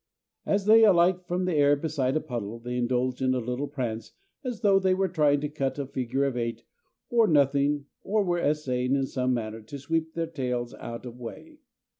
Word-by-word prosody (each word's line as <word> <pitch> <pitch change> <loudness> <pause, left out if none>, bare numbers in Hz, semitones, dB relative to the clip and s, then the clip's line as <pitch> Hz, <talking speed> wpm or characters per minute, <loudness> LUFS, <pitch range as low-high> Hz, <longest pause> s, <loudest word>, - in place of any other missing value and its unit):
As 200 -1 +1
they 225 +1 +7
alight 180 -2 +4
from 180 +1 -1
the 180 - 0
air 145 -1 +4
beside 140 -3 -1
a - - -1
puddle, 115 -6 -5
they 120 +1 -5
indulge 125 +1 0
in 130 0 +2
a - - +1
little 125 +4 -3
prance 120 -6 -4 0.3
as 245 -5 -4
though 200 -3 +5
they 190 -1 +2
were 190 0 +1
trying 150 -5 +2
to 150 - -1
cut 140 -2 -3
a 140 - -2
figure 130 0 -2
of 135 -2 -1
eight 115 -1 -3 0.5
on 230 -5 +4
nothing 140 0 +2 0.2
or 210 +1 +1
were 175 -2 0
essaying 135 -5 0
in 135 -1 +1
some 130 -1 -1
manner 110 -1 -4
to 110 +7 -8
sweep 160 +3 -2
their 165 0 0
tails 125 -6 -3
out 115 +1 -8
of 120 0 -9
way. 305 - -9
140 Hz, 205 wpm, -27 LUFS, 125-175 Hz, 0.5 s, they